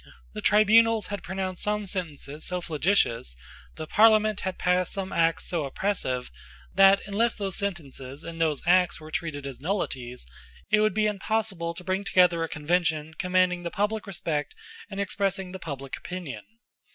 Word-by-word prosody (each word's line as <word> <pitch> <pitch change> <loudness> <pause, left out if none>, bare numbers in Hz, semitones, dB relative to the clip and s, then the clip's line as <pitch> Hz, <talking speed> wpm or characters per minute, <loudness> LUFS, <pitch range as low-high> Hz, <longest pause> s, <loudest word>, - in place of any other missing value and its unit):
The - - -5
tribunals 220 +1 +5
had 200 - -3
pronounced 190 0 -4
some 210 0 -1
sentences 155 -6 -5
so 180 0 -2
flagitious, 155 - +1 0.4
the 155 - -5
Parliament 215 +2 +4
had 190 -1 -3
passed 180 0 +1
some 195 -1 -4
acts 165 -1 +2
so 170 -4 -1
oppressive, 135 - -2 0.4
that, 195 +1 +6
unless 215 +4 +1
those 195 -3 -3
sentences 145 -7 -5
and 165 0 -6
those 155 -3 +1
Acts 180 0 +4
were 155 0 -11
treated 155 -4 -3
as 135 -3 -7
nullities, 130 - -3 0.5
it - - +5
would 215 0 +2
be 215 0 +2
impossible 205 -4 -1
to 180 - -8
bring 190 +2 -1
together 180 -4 +4
a 165 - -3
Convention 160 0 0
commanding 180 -1 +2
the 170 - -3
public 210 +3 -1
respect 170 - -3 0.3
and 195 -1 -6
expressing 195 -2 -1
the 190 - -7
public 140 -5 -6
opinion. 180 -6 -7
180 Hz, 160 wpm, -27 LUFS, 160-200 Hz, 0.5 s, that